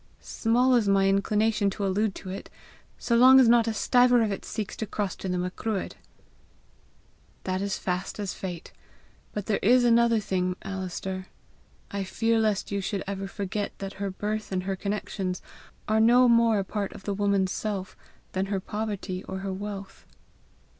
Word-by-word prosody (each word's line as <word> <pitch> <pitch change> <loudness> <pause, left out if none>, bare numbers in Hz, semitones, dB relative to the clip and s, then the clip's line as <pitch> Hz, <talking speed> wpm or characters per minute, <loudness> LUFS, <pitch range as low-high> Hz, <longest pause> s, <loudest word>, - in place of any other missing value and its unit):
"Small 245 +3 +2
is 235 -4 +3
my 195 0 +4
inclination 210 +1 +2
to 200 +1 -3
allude 195 +1 0
to 185 - -7
it 195 - -7 0.5
so 235 - 0
long 260 +3 +8
as 255 - +6
not 235 0 +5
a - - +2
stiver 245 +2 +4
of 215 - 0
it 195 - -4
seeks 215 -3 -5
to 220 - -3
cross 200 -3 -2
to 190 - -5
the 180 - 0
Macruadh!" 185 +3 -3 1.5
"That 185 0 -2
is 200 -1 -1
fast 180 0 -3
as 200 -3 -3
fate. 175 -3 -7 0.6
But 205 -2 -4
there 210 - 0
is 245 +5 +5
another 235 -1 +4
thing, 185 -3 -1
Alister: 190 0 -5 0.6
I 200 -1 -2
fear 225 +4 +1
lest 215 -3 0
you 200 0 -1
should 195 0 -3
ever 195 0 -4
forget 200 +1 -4
that 195 0 -6
her 200 - -1
birth 210 +3 -4
and 185 -1 -1
her 195 +1 -2
connections 195 -2 -3 0.5
are 220 +1 +2
no 245 +3 +6
more 230 -2 +4
a 200 - 0
part 200 0 -3
of 195 - -11
the 205 - -2
woman's 200 -2 +1
self 200 -4 -4 0.4
than 190 +1 -1
her 195 -1 -1
poverty 200 -2 -4
or 190 0 -5
her 195 - -2
wealth." 200 0 -7
200 Hz, 175 wpm, -27 LUFS, 190-220 Hz, 1.5 s, long